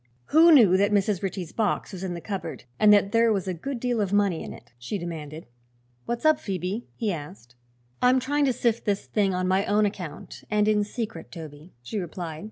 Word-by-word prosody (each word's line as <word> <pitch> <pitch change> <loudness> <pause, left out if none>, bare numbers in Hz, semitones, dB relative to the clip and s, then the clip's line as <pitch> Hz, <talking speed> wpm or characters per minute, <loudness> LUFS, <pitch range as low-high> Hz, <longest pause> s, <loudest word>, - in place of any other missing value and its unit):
"Who 330 +2 +8
knew 215 - +7
that 200 +2 +2
Mrs. 200 -2 +1
Ritchie's 185 -4 -4
box 210 -2 -1
was 185 0 -6
in 180 -2 -3
the 170 - -7
cupboard, 195 - -5 0.2
and 215 -1 +6
that 200 -1 +4
there 230 0 +4
was 195 -2 -1
a 185 - -1
good 245 +10 -5
deal 245 -2 0
of 195 -2 -1
money 200 -5 +2
in - - -7
it?" 120 - -13
she 120 - -4
demanded. 160 -3 -7 0.6
"What's 240 +4 -3
up, 310 -1 +5
Phoebe?" 190 +3 -4
he 215 -4 -1
asked. 120 - -9 0.5
"I'm 250 +1 +5
trying 285 +3 +1
to 260 - +2
sift 235 -1 0
this 205 -2 -1
thing 195 -3 0
on 185 0 -1
my 190 +1 +2
own 210 +1 +3
account, 180 -7 -6
and 210 -1 +2
in 210 -1 +3
secret, 225 +1 -6
Toby," 155 -1 -11
she 210 - -4
replied. 170 -3 -6
200 Hz, 210 wpm, -26 LUFS, 175-220 Hz, 0.6 s, Who